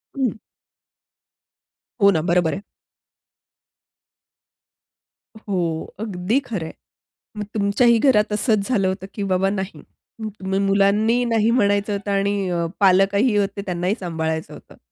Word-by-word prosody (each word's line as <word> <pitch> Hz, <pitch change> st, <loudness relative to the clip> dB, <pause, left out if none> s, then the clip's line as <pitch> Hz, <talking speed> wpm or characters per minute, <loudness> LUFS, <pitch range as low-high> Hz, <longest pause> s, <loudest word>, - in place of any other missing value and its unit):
हं. 260 Hz, -5 st, -1 dB, 1.6 s
हो 200 Hz, -, +7 dB
ना. 160 Hz, -4 st, +1 dB
बरोबर 170 Hz, 0 st, +1 dB
आहे. 195 Hz, -, -5 dB, 2.7 s
हो, 175 Hz, -7 st, -3 dB
अगदी 205 Hz, +2 st, -1 dB
खरं 195 Hz, -8 st, -4 dB
आहे. 160 Hz, -, -8 dB, 0.7 s
मग -, -, -2 dB
तुमच्याही 220 Hz, +3 st, +3 dB
घरात 215 Hz, -5 st, +3 dB
असंच 210 Hz, -1 st, +1 dB
झालं 200 Hz, -7 st, +2 dB
होतं 190 Hz, 0 st, -3 dB
की 205 Hz, -, -4 dB
बाबा 190 Hz, +1 st, +2 dB
नाही. 195 Hz, -1 st, -4 dB, 0.4 s
तुम्ही 195 Hz, -3 st, -3 dB
मुलांनी 200 Hz, +4 st, +2 dB
नाही 225 Hz, -2 st, +2 dB
म्हणायचं 205 Hz, -3 st, +2 dB
होतं 200 Hz, 0 st, -3 dB
आणि 200 Hz, -1 st, 0 dB
अ, 170 Hz, -1 st, -1 dB
पालकही 200 Hz, +4 st, +4 dB
होते 200 Hz, 0 st, -1 dB
त्यांनाही 180 Hz, +2 st, -1 dB
सांभाळायचं 160 Hz, -3 st, -3 dB
होतं. -, -, -14 dB
200 Hz, 120 wpm, -21 LUFS, 185-215 Hz, 2.7 s, हो